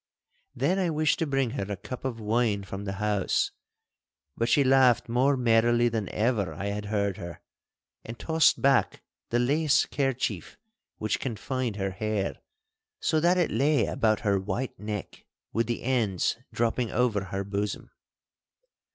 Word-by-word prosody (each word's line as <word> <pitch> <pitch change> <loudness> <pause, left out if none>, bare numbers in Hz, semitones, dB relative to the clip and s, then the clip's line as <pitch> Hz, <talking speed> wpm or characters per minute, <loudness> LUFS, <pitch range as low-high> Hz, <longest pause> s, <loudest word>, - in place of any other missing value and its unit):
Then 185 +2 +1
I 180 -3 +1
wished 155 -1 +1
to 165 - 0
bring 135 -4 0
her 105 -6 -4
a 100 - -3
cup 125 +6 -8
of 120 -3 -3
wine 110 -1 0
from 95 +1 -7
the 95 - -3
house. 105 -1 0 0.8
But 115 +1 0
she 145 - +4
laughed 130 -3 +4
more 130 +4 +2
merrily 120 0 +3
than 110 -4 -3
ever 110 -3 0
I 100 - -3
had 105 +1 -4
heard 100 -2 -1
her, 85 -3 -8 0.6
and 115 +1 -8
tossed 160 +7 +3
back 135 0 +2 0.3
the 120 - +1
lace 145 +5 +3
kerchief 135 -3 -2 0.4
which 110 -1 -1
confined 125 -1 -3
her 95 -1 -2
hair, 105 +1 -2 0.6
so 155 - +1
that 175 +3 +3
it 175 - +1
lay 140 +3 +2
about 110 -2 +1
her 100 -2 +2
white 105 +7 -4
neck 105 -2 -6 0.3
with 115 0 +1
the 120 - -3
ends 115 -8 +1 0.2
dropping 120 0 0
over 110 -4 +1
her 95 +1 -3
bosom. 100 +1 -4
115 Hz, 155 wpm, -27 LUFS, 100-130 Hz, 0.8 s, she